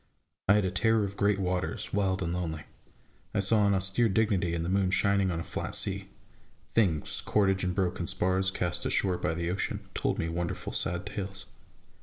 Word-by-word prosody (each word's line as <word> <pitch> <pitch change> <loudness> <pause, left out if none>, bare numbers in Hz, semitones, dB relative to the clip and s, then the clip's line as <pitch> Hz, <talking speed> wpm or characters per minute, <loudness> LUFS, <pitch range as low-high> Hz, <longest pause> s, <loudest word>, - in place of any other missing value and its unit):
I 100 - +8
had 105 -2 +2
a 95 - 0
terror 110 +3 +3
of 100 0 -4
great 100 0 +2
waters, 90 -1 -2
wild 95 -1 +1
and 85 0 -2
lonely; 80 -3 -3 0.7
I - - +2
saw 100 +1 +4
an 100 - +3
austere 95 +5 +3
dignity 95 -5 +1
in 85 - -2
the - - -3
moon 95 0 +2
shining 100 0 +2
on 85 -2 -2
a - - -3
flat - - -4
sea; - - -2 0.6
things, 90 -9 +1
cordage 95 -2 +2
and 90 -1 -1
broken 90 -2 -1
spars, 95 0 +1
cast 90 -2 -2
ashore 90 -2 +1
by 80 - -1
the 85 0 -1
ocean, 95 - -2
told - - -1
me 80 - -1
wonderful, 85 +1 -3
sad 95 +1 -1
tales. 95 -2 -5
95 Hz, 190 wpm, -29 LUFS, 90-100 Hz, 0.7 s, I